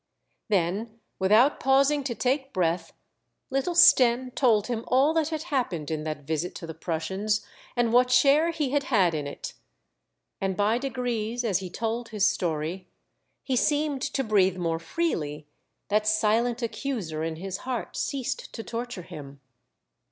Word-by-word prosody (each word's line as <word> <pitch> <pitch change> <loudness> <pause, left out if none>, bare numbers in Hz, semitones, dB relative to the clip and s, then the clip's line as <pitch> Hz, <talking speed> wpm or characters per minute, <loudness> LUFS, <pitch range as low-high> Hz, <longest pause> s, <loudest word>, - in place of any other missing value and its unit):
Then 205 +4 -1 0.2
without 215 +9 +4
pausing 275 +2 +3
to 240 -4 -2
take 265 +5 -1
breath, 170 -2 0 0.6
little 275 +6 0
Stenne 255 -6 +6
told 225 -7 +3
him 230 -1 -3
all 270 +5 +3
that 320 -2 +1
had 315 -1 -3
happened 235 - -2
in 155 -1 -3
that 155 -2 -5
visit 160 +3 -2
to - - -7
the 165 - -7
Prussians, 190 +6 -2 0.3
and 240 -2 +1
what 250 +1 +5
share 280 +6 +5
he 305 -5 -2
had 285 -1 +1
had 195 -10 +3
in 150 -2 -3
it. - - -7 0.9
And, 195 -1 -1
by 210 +3 +2
degrees, 245 -3 -2
as 200 -6 +1
he 185 -2 -6
told 230 +4 -3
his 210 -3 +1
story 170 +1 -1 0.6
he 265 - -1
seemed 290 +1 +1
to 280 -1 -1
breathe 195 -5 +2
more 165 -2 -1
freely, 155 - -2 0.4
that 210 +1 +1
silent 225 +3 +2
accuser 215 - -3
in 165 0 -2
his 190 +3 -5
heart 250 0 -5
ceased 280 - -3
to 225 - -6
torture 235 -5 -5
him. 140 -4 -10
225 Hz, 155 wpm, -26 LUFS, 180-260 Hz, 0.9 s, Stenne